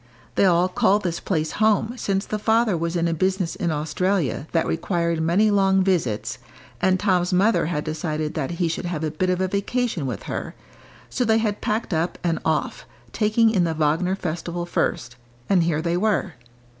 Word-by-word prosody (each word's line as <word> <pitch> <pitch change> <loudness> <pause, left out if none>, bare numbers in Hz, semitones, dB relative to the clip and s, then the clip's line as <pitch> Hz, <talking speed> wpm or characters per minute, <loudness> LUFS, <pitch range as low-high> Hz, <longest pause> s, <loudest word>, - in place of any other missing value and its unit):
They - - +3
all 180 -1 +4
called 210 +1 +2
this 170 -2 -2
place 160 -4 -1
home 220 +1 +2
since 195 -5 -1
the 215 - -3
father 220 -1 +2
was 170 +1 -2
in 170 0 +1
a 165 - 0
business 185 +1 0
in 175 -5 -1
Australia 155 - -1
that 165 - +1
required 170 -1 -1
many 185 +7 +3
long 195 -1 +3
visits, 115 - -1 0.4
and 185 0 +3
Tom's 180 -3 +1
mother 190 -1 +3
had 150 -3 -2
decided 155 -1 -3
that 145 -5 -2
he 175 - +1
should 165 +2 -3
have 170 -3 -3
a 155 - -1
bit 185 +4 -1
of 180 0 +1
a 190 - +1
vacation 200 - -1
with 120 -6 -5
her, - - -5 0.5
so 255 - -1
they 220 -2 +3
had 215 -2 -1
packed 215 -2 -1
up 165 +2 -1
and 170 -2 0
off, 160 -1 -1 0.3
taking 220 +1 +3
in 190 -5 +2
the 165 -1 -1
Wagner 160 +5 +1
festival 175 -1 -4
first, 125 -7 -2 0.3
and 190 -3 +3
here 155 -2 0
they 170 0 0
were. 200 -3 0
180 Hz, 190 wpm, -23 LUFS, 160-200 Hz, 0.5 s, all